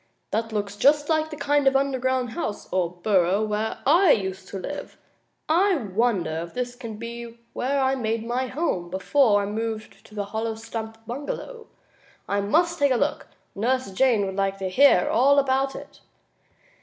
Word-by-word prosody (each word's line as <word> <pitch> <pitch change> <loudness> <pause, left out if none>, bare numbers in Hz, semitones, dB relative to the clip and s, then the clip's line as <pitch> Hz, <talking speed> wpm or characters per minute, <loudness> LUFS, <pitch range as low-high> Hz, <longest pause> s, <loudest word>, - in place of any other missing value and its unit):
"That 225 0 -1
looks 205 -1 -3
just 290 +6 +3
like 315 -1 +1
the 305 - -7
kind 290 -1 +1
of 270 - +4
an 270 - +5
underground 260 -2 -1
house, 225 -8 -4
or 180 -2 +1
burrow, 185 +2 +1
where 215 +1 -2
I 340 +7 +5
used 190 -5 +1
to 195 - -6
live. 285 +10 -7 0.5
I 370 +5 +3
wonder 200 - 0
if 170 0 -9
this 245 -1 -3
can 230 -3 -8
be 235 +1 -7 0.2
where 275 +3 0
I 265 0 +2
made 225 -3 -2
my 250 +2 -1
home 250 - -2
before 205 +3 +3
I - - -2
moved 220 +1 -5
to 215 - -16
the 205 -1 -2
hollow 220 +2 -3
stump 225 0 -7
bungalow? 295 - -6 0.6
I 200 0 0
must 335 - +1
take 285 -1 +3
a - - +4
look. - - -1 0.3
Nurse 250 +1 -1
Jane 225 0 +3
would 190 0 -4
like 195 0 0
to 190 -1 -3
hear 220 -2 +5
all 275 +4 +4
about 270 0 +2
it." - - -10
230 Hz, 180 wpm, -24 LUFS, 205-270 Hz, 0.6 s, an